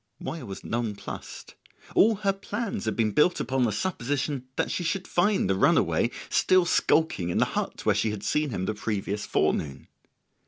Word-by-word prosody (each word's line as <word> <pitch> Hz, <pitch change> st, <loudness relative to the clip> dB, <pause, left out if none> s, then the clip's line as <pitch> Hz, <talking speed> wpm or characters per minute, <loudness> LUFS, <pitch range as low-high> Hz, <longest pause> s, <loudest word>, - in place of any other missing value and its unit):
Moya -, -, -6 dB
was 95 Hz, -, -7 dB
nonplussed: 115 Hz, -3 st, -5 dB, 0.4 s
all 220 Hz, +2 st, +5 dB
her 200 Hz, -1 st, 0 dB
plans 200 Hz, -, -4 dB
had 110 Hz, -, -1 dB
been 110 Hz, -2 st, +1 dB
built 160 Hz, -, +3 dB
upon 130 Hz, -1 st, +1 dB
the 110 Hz, -, +1 dB
supposition 135 Hz, -, -2 dB
that -, -, -1 dB
she 180 Hz, -, -2 dB
should 180 Hz, +3 st, -2 dB
find 190 Hz, -, +2 dB
the 95 Hz, -, +2 dB
runaway 95 Hz, -, +3 dB, 0.2 s
still 185 Hz, -1 st, +3 dB
skulking 160 Hz, -, +2 dB
in 85 Hz, -, -1 dB
the -, -, +4 dB
hut -, -, -3 dB
where -, -, +4 dB
she 110 Hz, -, +1 dB
had 105 Hz, -1 st, -5 dB
seen 150 Hz, -1 st, 0 dB
him 95 Hz, -6 st, -3 dB
the 110 Hz, -, -1 dB
previous 105 Hz, -1 st, -3 dB
forenoon. 70 Hz, -3 st, 0 dB
130 Hz, 180 wpm, -27 LUFS, -, 0.4 s, all